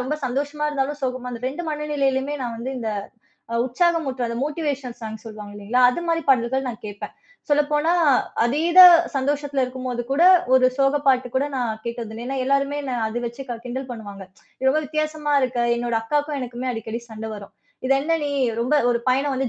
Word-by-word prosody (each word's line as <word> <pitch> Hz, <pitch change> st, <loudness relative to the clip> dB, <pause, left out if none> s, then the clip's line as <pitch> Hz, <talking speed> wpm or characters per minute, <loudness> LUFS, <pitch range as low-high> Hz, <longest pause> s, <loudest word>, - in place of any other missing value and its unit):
ரொம்ப 295 Hz, +4 st, -2 dB
சந்தோஷமா 285 Hz, +4 st, -2 dB
இருந்தாலும், 290 Hz, 0 st, -2 dB
சோகமா 255 Hz, -1 st, -3 dB
அந்த 235 Hz, -, -7 dB
2 335 Hz, +6 st, -6 dB
மனநிலையிலுமே 290 Hz, -2 st, -1 dB
நான் 235 Hz, -2 st, -4 dB
வந்து 255 Hz, +3 st, -4 dB
இந்த 225 Hz, -2 st, -3 dB, 0.6 s
அ -, -, -1 dB
உற்சாகம் 330 Hz, +4 st, +1 dB
ஊட்டுற, 255 Hz, -2 st, -2 dB
அந்த 235 Hz, -, -4 dB
மோட்டிவேஷன் 285 Hz, -5 st, -4 dB
சாங்க் 220 Hz, 0 st, -7 dB
சொல்லுவாங்க 210 Hz, -2 st, -9 dB
இல்லைங்களா, 210 Hz, +5 st, 0 dB
அது 345 Hz, -, -4 dB
மாதிரி 330 Hz, -1 st, 0 dB
பாடல்கள் 260 Hz, 0 st, +2 dB
நான் 225 Hz, -, -7 dB
கேப்பேன். 205 Hz, 0 st, -7 dB, 0.4 s
சொல்லப்போனா, 295 Hz, +2 st, +2 dB, 0.5 s
அதீத 325 Hz, +9 st, +4 dB, 0.3 s
சந்தோஷத்துல 280 Hz, 0 st, 0 dB
இருக்கும் 255 Hz, 0 st, -6 dB
போது 240 Hz, -1 st, -2 dB
கூட 280 Hz, +5 st, +2 dB, 0.3 s
ஒரு 255 Hz, -1 st, +6 dB
சோக 275 Hz, +1 st, +3 dB
பாட்டு 255 Hz, -2 st, +3 dB
கூட 270 Hz, +2 st, +1 dB
நான் 240 Hz, -3 st, -1 dB
கேட்டது 235 Hz, -2 st, -5 dB
இல்ல. 230 Hz, -, -7 dB
ஏன்னா, 270 Hz, +1 st, -3 dB
எல்லாருமே 275 Hz, +1 st, +1 dB
என்னை 260 Hz, -2 st, -3 dB
அத 225 Hz, +2 st, -3 dB
வச்சு 235 Hz, +3 st, -6 dB
க 240 Hz, -, -3 dB
கிண்டல் 260 Hz, +2 st, -5 dB
பண்ணுவாங்க. 205 Hz, -4 st, -8 dB, 0.4 s
ரொம்ப 305 Hz, +3 st, +3 dB
வித்தியாசமா 310 Hz, 0 st, -2 dB
இருக்க 255 Hz, -2 st, -1 dB, 0.2 s
என்னோட 235 Hz, -1 st, -1 dB
அக்காக்கும், 290 Hz, +5 st, -1 dB
எனக்குமே 250 Hz, 0 st, -4 dB
அடிக்கடி 225 Hz, 0 st, -5 dB
சண்டை 220 Hz, 0 st, -7 dB
வரும். 200 Hz, -1 st, -10 dB, 0.3 s
"இது 270 Hz, -, +3 dB
என்ன 330 Hz, +3 st, +1 dB
நீ?" 290 Hz, -, -2 dB, 0.3 s
ரொம்ப 250 Hz, +5 st, +1 dB, 0.2 s
ஒரு 235 Hz, -, 0 dB
பயணம் 270 Hz, +2 st, +1 dB
வந்து 260 Hz, -1 st, -1 dB
260 Hz, 185 wpm, -23 LUFS, 240-290 Hz, 0.6 s, ஒரு